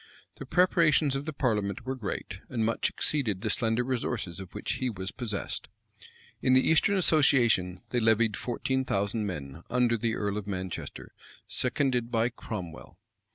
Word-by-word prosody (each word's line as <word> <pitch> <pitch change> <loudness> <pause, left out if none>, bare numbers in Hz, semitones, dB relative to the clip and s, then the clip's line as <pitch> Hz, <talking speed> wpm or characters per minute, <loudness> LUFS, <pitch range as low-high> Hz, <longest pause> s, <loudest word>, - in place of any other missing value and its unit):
The 135 - -8
preparations 160 -4 +3
of 135 +1 -3
the 155 - -2
parliament 110 -6 -1
were 130 - -1
great, 100 -5 -5
and 115 -3 0
much 115 - +1
exceeded 115 -11 0
the 110 -1 0
slender 115 +1 +1
resources 120 -7 -2
of 95 0 -10
which 105 - -2
he 130 - +1
was 95 -3 -5
possessed. 110 -5 -3 0.7
In 130 - +3
the 130 - +5
eastern 160 +5 +4
association 120 - +3
they 125 - +2
levied 110 -1 +3
fourteen 130 +2 -1
thousand 105 -2 -1
men, 70 -7 -6
under 120 -1 +2
the 115 +1 0
earl 105 -1 -2
of 105 - -9
Manchester, 95 -2 -5 0.4
seconded 125 -2 0
by 115 0 +2
Cromwell. 95 -9 -8
115 Hz, 155 wpm, -29 LUFS, 100-130 Hz, 0.7 s, the